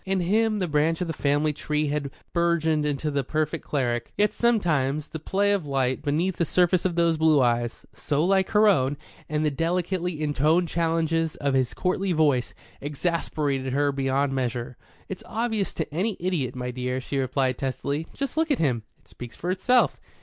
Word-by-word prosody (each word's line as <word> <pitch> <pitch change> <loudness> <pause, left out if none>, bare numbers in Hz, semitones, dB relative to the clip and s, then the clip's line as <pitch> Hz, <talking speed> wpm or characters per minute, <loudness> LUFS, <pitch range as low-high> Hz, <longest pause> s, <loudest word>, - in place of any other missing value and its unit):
In 190 0 0
him 215 +4 +2
the 185 -3 -1
branch 155 +2 +1
of - - +1
the 165 - -3
family 150 +1 +1
tree 150 0 -1
had 145 -1 -2 0.2
burgeoned 160 -3 +1
into 150 +1 -1
the 140 -1 0
perfect 155 +3 -2
cleric. 120 -5 -1
Yet 210 0 +2
sometimes, 155 - +1
the 160 - -6
play 200 +5 +1
of 195 -7 0
light 130 -2 0
beneath 165 +6 0
the - - +2
surface 180 +1 +2
of 180 -2 0
those 170 -1 +2
blue 160 -2 +5
eyes, 120 -2 0
so 150 +1 0
like 190 0 +2
her 215 0 +4
own, 140 -8 +3 0.3
and 155 0 0
the 150 - +2
delicately 175 +2 -1
intoned 155 +3 +2
challenges 165 -1 0
of 140 -1 -1
his 130 -2 +1
courtly 185 0 0
voice, 145 -6 +1 0.3
exasperated 145 -3 -2
her 145 +1 +2
beyond 135 0 0
measure. 125 -2 -2 0.3
"It's 190 - -6
obvious 220 -3 -1
to 160 -3 -4
any 195 +5 -1
idiot, 170 -9 -1
my 125 0 -3
dear," 125 +1 -2
she 135 +2 -3
replied 130 -1 0
testily. 140 +3 -2
"Just 275 +2 -4
look 320 0 +2
at 285 - +2
him. 125 -7 +1 0.2
It - - -32
speaks 120 -1 -10
for 175 - -3
itself." 245 +7 +2
155 Hz, 185 wpm, -25 LUFS, 140-180 Hz, 0.3 s, blue